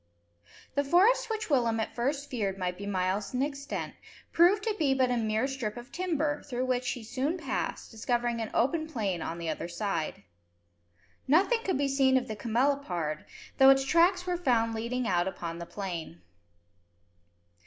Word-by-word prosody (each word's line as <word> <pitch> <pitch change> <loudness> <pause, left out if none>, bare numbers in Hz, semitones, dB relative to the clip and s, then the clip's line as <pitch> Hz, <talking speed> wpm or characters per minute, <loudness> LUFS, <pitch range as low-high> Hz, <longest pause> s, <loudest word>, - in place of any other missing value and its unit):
The 285 - +1
forest 410 - +4
which 440 -1 -2
Willem 235 -4 +2
at 220 - -2
first 280 +4 -1
feared 205 -8 -2
might 180 -1 -2
be 200 +2 -7
miles 195 +3 -1
in 255 - +2
extent, 280 -1 -4 0.4
proved 370 +5 +5
to 440 -1 0
be 275 -4 +3
but 255 -1 +2
a - - +2
mere 220 0 0
strip 245 -5 -4
of 240 +2 -10
timber, 310 -5 -1
through 255 -2 -3
which 255 0 0
he 245 - -4
soon 270 +9 -2
passed, 295 -7 -3
discovering 235 0 -1
an 220 - -3
open 315 +6 +1
plain 205 - -2
on 165 - -4
the 170 -1 -5
other 160 +2 -3
side. 170 -2 -3 1.0
Nothing 385 - +4
could 375 - 0
be 280 0 +1
seen 270 -1 +3
of 255 - -1
the 215 - -4
camelopard, 220 - -1 0.3
though 265 0 +9
its 270 0 +5
tracks 350 +4 +3
were 360 -1 -1
found 235 -8 +2
leading 235 +2 -2
out 175 0 +2
upon 170 -3 -5
the 170 - -7
plain. 170 - -6
250 Hz, 175 wpm, -29 LUFS, 210-285 Hz, 1.0 s, though